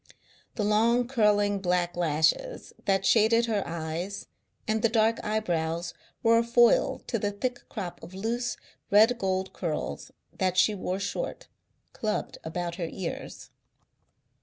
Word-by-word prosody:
The 215 - -1
long, 230 +4 +3
curling 205 -5 +2
black 180 -1 0
lashes 175 - 0
that 195 -1 +2
shaded 230 +2 +4
her 215 -3 0
eyes 170 +4 -4 0.4
and 215 0 +1
the 230 - +3
dark 225 0 +2
eyebrows 170 -6 -1 0.3
were 230 0 +5
a - - +2
foil 235 0 +3
to 230 - -2
the 205 - 0
thick 245 +5 -4
crop 185 -6 -6
of 185 - -11
loose, 235 +5 -2 0.3
red 220 +4 +5
gold 190 0 -1
curls 155 - -4 0.3
that 185 -1 0
she 215 - +5
wore 185 -1 -3
short, 200 - -4 0.4
clubbed 215 -1 -3
about 170 +1 -4
her 170 -3 -3
ears. 185 -3 -6
205 Hz, 135 wpm, -28 LUFS, 175-230 Hz, 0.4 s, were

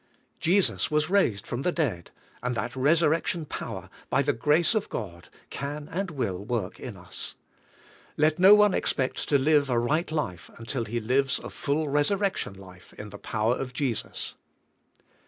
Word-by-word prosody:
Jesus 185 +3 +2
was 150 +2 +1
raised 155 - +2
from 120 - -3
the 180 - +1
dead, 125 - -2 0.3
and 125 0 -1
that 120 +2 -3
resurrection 160 +4 +2
power, - - -6 0.2
by 140 - +2
the 145 +1 +1
grace 155 +6 +3
of 215 -2 -1
God, 85 -6 -6 0.2
can 145 +1 -5
and 190 +3 -2
will 110 - -3
work 110 -4 -3
in - - -7
us. - - -7 0.8
Let 155 +1 +3
no 195 +3 +9
one 210 -2 +5
expect 130 -1 0
to 145 - +5
live 145 0 +3
a 120 - +2
right 150 +8 +1
life 90 - -3
until 115 +1 -3
he 120 +3 -2
lives 130 +4 +1
a - - -8
full 150 +2 -1
resurrection 185 - +1
life 95 -2 -14
in 105 0 -9
the 100 - -9
power 110 +2 0
of 130 0 -4
Jesus. 130 -5 -2
140 Hz, 165 wpm, -27 LUFS, 115-160 Hz, 0.8 s, no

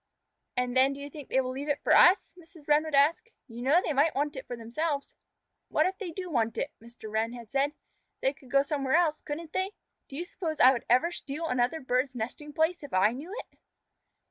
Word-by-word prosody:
"And 250 0 0
then 265 +2 +5
do 275 - -9
you 285 0 -7
think 290 -2 -10
they 265 - +3
will 255 -1 -3
leave 280 +3 -5
it 290 - -1
for - - +4
us?" 370 +4 +6
Mrs. 330 -3 -17
Wren 300 +1 +4
would 310 -2 -1
ask. 330 +12 +3 0.2
"You 235 -1 -9
know 280 +7 +4
they 310 - 0
might 290 +4 +3
want 290 +1 -1
it 265 - -7
for 245 - -5
themselves." 280 +6 -3 0.5
"What - - +2
if 375 +1 -2
they 400 -5 -4
did 365 +3 -6
want 230 -7 0
it?" - - -2
Mr. 235 -1 -12
Wren 220 +2 0
had 235 -3 -10
said. 280 +2 +1 0.5
"They 265 - +1
could 265 -2 -19
go 275 +2 +4
somewhere 280 -1 0
else, 325 -3 +2
couldn't 315 +2 -6
they? 375 +2 -1 0.4
Do 270 - -9
you 340 +5 -3
suppose 330 -3 -5
I 255 - +8
would 240 - -4
ever 255 +9 +4
steal 305 0 -5
another 250 +3 +1
bird's 255 +1 0
nesting 250 +6 -5
place 320 +4 +1
if 285 -9 -6
I 190 +3 +4
knew 285 +9 -8 0.2
it?" - - -34
280 Hz, 230 wpm, -29 LUFS, 250-320 Hz, 0.5 s, I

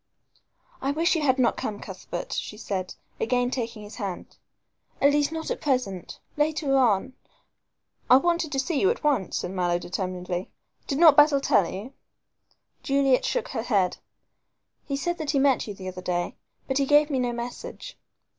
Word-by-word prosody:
"I 270 - -1
wish 325 +5 +2
you 325 - 0
had 265 -3 +3
not 250 -3 +2
come, 205 -1 -4
Cuthbert," 180 -2 -6
she 210 - -4
said, 190 -4 -4 0.2
again 245 +1 +1
taking 230 -4 -4
his 205 +1 -10
hand, 195 -6 -6 0.6
"at 280 - +5
least 290 +1 +2
not 320 0 -4
at - - -3
present. 250 - -2 0.2
Later 295 -2 +1
on 250 -1 +2 0.5
" - - -44
"I 255 - +9
wanted 340 +1 0
to 275 - -2
see 285 +2 0
you 385 - +4
at 475 - -2
once," 275 -11 +1
said 180 - -3
Mallow, 175 -2 +1
determinedly. 180 0 -4 0.4
"Did 275 - -1
not 315 -3 +8
Basil 295 -1 +6
tell 200 -9 +2
you 200 +6 -6
so?" - - -30 0.9
Juliet 275 -2 +2
shook - - -1
her - - -2
head. 200 -6 +1 0.9
"He 280 -1 -1
said 320 0 -2
he 285 - +2
met 270 -3 +3
you 205 - -6
the 190 -1 -8
other 185 0 -8
day, 175 -1 -2 0.3
but 265 - 0
gave 295 +2 +4
me 265 - +1
no 245 -1 0
message." 240 - -7
260 Hz, 175 wpm, -26 LUFS, 200-290 Hz, 0.9 s, I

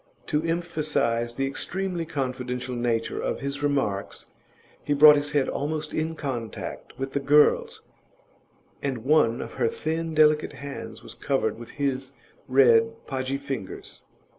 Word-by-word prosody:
To 150 -1 0
emphasise 155 -8 -1
the 135 - 0
extremely 170 +5 -3
confidential 125 -3 -3
nature 120 -1 -1
of - - -2
his 140 +1 -3
remarks, 135 -9 -1 0.5
he 145 - +1
brought 150 +1 +9
his 145 +1 -2
head 145 -3 +2
almost 150 +1 -3
in 160 +1 -1
contact 120 -8 -5
with 135 0 -3
the 140 - +1
girl's, 145 +2 +3 1.0
and 130 -4 -3
one 135 -6 +3
of - - -7
her 125 -3 +1
thin, 160 +5 -2
delicate 155 0 +4
hands 125 -6 -8
was - - -9
covered 135 -5 -1
with 120 - -9
his 135 -1 -1 0.3
red, 115 -4 +4
podgy 130 0 -2
fingers. 135 -8 -6
140 Hz, 140 wpm, -26 LUFS, 125-150 Hz, 1.0 s, brought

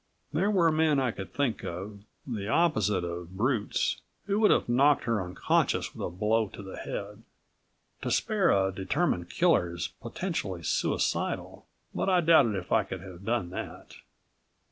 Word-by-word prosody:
There 185 +7 +2
were 175 -6 +4
men 155 -2 +3
I 130 -3 +1
could 95 -2 -8
think 130 -4 -1
of, 100 +4 -6 0.2
the 110 -6 -4
opposite 110 - +2
of 85 +1 -6
brutes, 115 -1 0 0.2
who 200 +1 0
would 215 - +5
have - - +3
knocked 135 +4 +4
her 115 -5 0
unconscious 90 0 0
with - - -7
a - - -1
blow 105 +5 +1
to 100 - -10
the 95 - -8
head. 105 +2 -6 0.8
To - - -2
spare 210 -4 +2
a 95 -1 +3
determined 95 - -1
killer 90 - +2
is 85 - -3
potentially 115 - -4
suicidal, 70 - -1 0.3
but - - -1
I 185 -1 +4
doubted 155 -10 +5
if 90 -2 -5
I 110 - +4
could 95 -2 -7
have 95 0 -11
done 110 -7 -1
that. - - -7
110 Hz, 165 wpm, -28 LUFS, 95-155 Hz, 0.8 s, would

